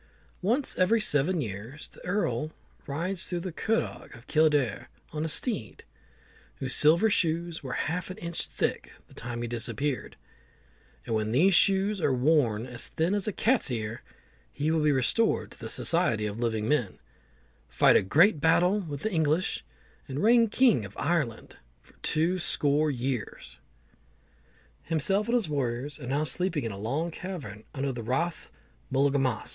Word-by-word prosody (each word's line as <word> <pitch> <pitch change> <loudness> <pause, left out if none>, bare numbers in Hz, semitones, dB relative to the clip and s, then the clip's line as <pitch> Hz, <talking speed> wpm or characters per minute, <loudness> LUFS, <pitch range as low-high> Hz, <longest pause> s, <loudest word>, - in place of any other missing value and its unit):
Once 240 +9 +1
every 190 +5 +4
seven 160 -2 +1
years 110 +6 -7
the - - -17
Earl 155 - -1 0.3
rides 170 +7 -3
round 175 -1 -2
the 185 - -4
Curragh 225 +7 -2
of 115 +1 -15
Kildare 150 -7 +1 0.2
on 155 0 -2
a - - -1
steed, 160 - -1 0.7
whose 130 -2 -3
silver 165 - +5
shoes 170 -2 0
were 130 -2 -5
half 175 +3 -3
an 185 - -7
inch 170 0 -4
thick - - -3
the - - -18
time 120 0 -5
he - - -2
disappeared; 120 +4 -3 0.9
and - - -3
when 110 0 0
these 175 +11 +4
shoes 195 +2 +3
are 135 - +2
worn 125 -5 +2
as 125 -1 -1
thin 165 +4 0
as 205 -1 0
a - - +1
cat's 230 - +2
ear, 115 -1 -4 0.5
he 150 - -1
will 160 - +2
be 150 0 +3
restored 140 - +1
to - - -14
the - - -6
society 140 -11 +1
of 105 +1 -4
living 110 -2 -1
men, 125 -8 0 0.7
fight - - +4
a - - +6
great 155 - +4
battle 175 +5 +3
with 150 -7 -6
the 220 - -1
English, 160 0 0 0.4
and 140 +2 -3
reign 230 +1 +5
king 230 - +3
of 100 -1 -10
Ireland 150 -10 -2 0.2
for - - -24
two 170 +4 0
score 150 -2 +2
years. 125 -3 -4 1.2
Himself 195 +7 0
and 235 - +1
his 230 -7 +1
warriors 140 0 -2
are 125 - -8
now 140 +4 0
sleeping 165 -1 -1
in 115 - -3
a 100 - -7
long 140 +11 -2
cavern 145 - -7
under 135 0 -1
the 120 -2 -5
Rath 145 +9 -2
of - - -23 0.4
Mullaghmast. 135 -3 +1
150 Hz, 165 wpm, -28 LUFS, 125-180 Hz, 1.2 s, a